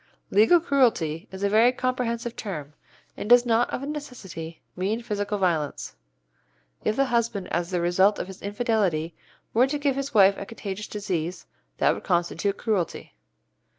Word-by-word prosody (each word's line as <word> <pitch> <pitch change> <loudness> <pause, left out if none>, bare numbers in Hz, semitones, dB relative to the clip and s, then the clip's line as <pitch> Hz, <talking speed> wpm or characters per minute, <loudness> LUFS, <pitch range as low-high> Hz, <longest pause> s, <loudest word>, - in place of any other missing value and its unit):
Legal 220 - +6
cruelty 235 - +1
is 190 +1 -7
a - - +4
very 225 +4 +5
comprehensive 245 -2 -2
term, 150 -8 -6 0.4
and 210 - -6
does 245 0 +7
not 235 0 +2
of 275 - -4
necessity 195 - -7 0.2
mean 195 +5 -1
physical 205 -2 -2
violence. 160 - -1 0.9
If 215 - +1
the 275 - +3
husband 235 -6 0
as 175 0 -1
the 180 -2 -1
result 190 +4 +3
of - - -3
his 190 0 -11
infidelity 200 -7 0 0.4
were 245 +4 +4
to 295 +2 -1
give 285 -2 0
his 275 0 -3
wife 195 -2 +5
a - - -5
contagious 210 -2 -6
disease, 180 -4 -3 0.3
that - - +3
would - - -8
constitute 175 +3 0
cruelty. 205 -8 -2
205 Hz, 155 wpm, -25 LUFS, 180-240 Hz, 0.9 s, does